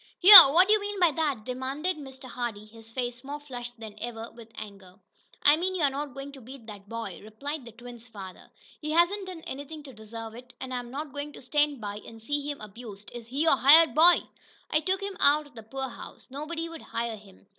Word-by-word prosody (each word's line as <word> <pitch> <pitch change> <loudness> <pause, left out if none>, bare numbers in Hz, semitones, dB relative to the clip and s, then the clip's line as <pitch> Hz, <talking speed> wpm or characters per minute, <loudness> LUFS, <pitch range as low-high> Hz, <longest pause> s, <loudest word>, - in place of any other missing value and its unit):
"Here! 385 0 +13
What'd 350 +9 +4
you 430 -1 +4
mean 410 -1 -5
by 350 -3 +4
that?" 290 -7 -2
demanded 270 +8 -3
Mr. 265 -3 -12
Hardee, 235 -4 -5
his 225 +1 -16
face 245 0 -5
more 285 +2 -7
flushed 245 -4 -9
than 220 -2 -9
ever 230 -1 -6
with 230 -1 -14
anger. 195 -3 -11 0.5
"I 290 +1 +6
mean 375 +3 -2
you're 295 -6 +1
not 280 -1 -6
going 275 +1 -8
to 275 -2 -12
beat 250 0 -12
that 205 -2 -12
boy!" 230 -5 -6
replied 275 +7 -7
the 235 - -11
twins' 240 +1 -13
father. 195 -5 -11 0.3
"He 305 - -5
hasn't 345 +5 +1
done 360 -3 -8
anything 290 +2 -8
to 270 -2 -12
deserve 220 +1 -9
it, 250 +2 -13
and 260 -1 -6
I'm 245 -1 -5
not 285 +2 -7
going 290 +1 -6
to - - -12
stand 295 -1 0
by 205 -1 -5
and 225 +1 -12
see 290 +5 -3
him 290 - -5
abused. 210 -1 -11
Is 235 -2 -9
he 275 +5 -1
your 320 -4 +4
hired 310 +5 +7
boy?" 340 +3 +6 0.5
"I 310 - +3
took 375 +5 -1
him 395 -2 -5
out 295 +2 +3
of 290 - -19
the 225 - -10
poorhouse 265 +3 -8
nobody 320 +4 -5
would 330 -1 -10
hire 230 -1 -4
him. 200 -2 -18
265 Hz, 220 wpm, -27 LUFS, 230-300 Hz, 0.5 s, Here